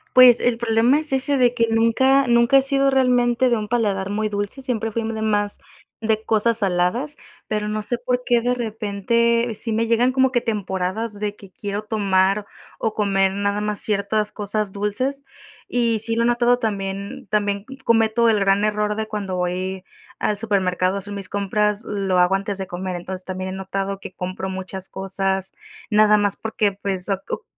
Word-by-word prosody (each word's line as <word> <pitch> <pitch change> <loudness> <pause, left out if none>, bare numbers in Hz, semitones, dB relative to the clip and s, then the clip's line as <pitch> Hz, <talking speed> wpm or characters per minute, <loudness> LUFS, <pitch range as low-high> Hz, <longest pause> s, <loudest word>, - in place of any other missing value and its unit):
Pues, 250 -2 +8
el 240 -1 +1
problema 235 +4 +3
es 310 -2 -6
ese 270 +1 +1
de 245 -1 +3
que 230 -2 +2
nunca 260 +4 +3
nunca 235 +2 +5
he - - +6
sido 275 0 +2
realmente 250 -1 +3
de 240 - +2
un 210 -1 -4
paladar 205 -4 0
muy 215 +1 -1
dulce, 205 +5 -3
siempre 225 -4 -2
fuimos 225 0 -2
de 220 - -3
más 205 -1 +1 0.4
de 220 -1 0
cosas 225 +1 +1
saladas, 200 +10 0 0.3
pero 210 -1 -2
no 215 0 -2
sé 240 +3 -2
por 250 +1 -1
qué 240 -1 +3
de 245 +1 +1
repente 230 +1 0
sí 225 +2 -2
me 230 +1 +1
llegan 235 +2 +3
como 265 0 +3
que 245 - +2
temporadas 205 0 -3
de 210 0 -2
que 200 -2 -14
quiero 205 +2 -5
tomar 200 -1 +1 0.3
o 220 - -1
comer 195 -2 +2
nada 200 +1 -1
más 210 -1 -2
ciertas 210 0 0
cosas 210 -1 -3
dulces, 230 +8 -2 0.4
y 235 -2 +1
sí 225 +1 -1
lo 230 - +1
he - - +2
notado 240 0 +3
también 200 -3 -4
también 205 -1 0 0.2
cometo 230 0 +3
el 215 -2 +3
gran 195 +1 +3
error 210 0 0
de 220 0 -3
cuando 200 -4 -4
voy 185 +1 -2 0.4
al 210 - 0
supermercado 190 -4 0
a - - -2
hacer 205 +1 -8
mis 195 -1 -5
compras, 210 +1 0
lo 195 -3 0
hago 180 +2 +4
antes 195 0 -3
de 190 - -4
comer. 180 0 -4
Entonces, 185 +1 -6
también 185 0 -4
he - - -5
notado 195 +1 -3
que 185 - -9
compro 185 +1 -5
muchas 190 0 -6
cosas, 190 0 -2 0.4
nada 210 -1 +5
más 205 -1 +1
porque, 220 -2 0
pues, 195 -1 -4
oc 195 -1 -1
uh - - -3
210 Hz, 190 wpm, -22 LUFS, 195-235 Hz, 0.4 s, Pues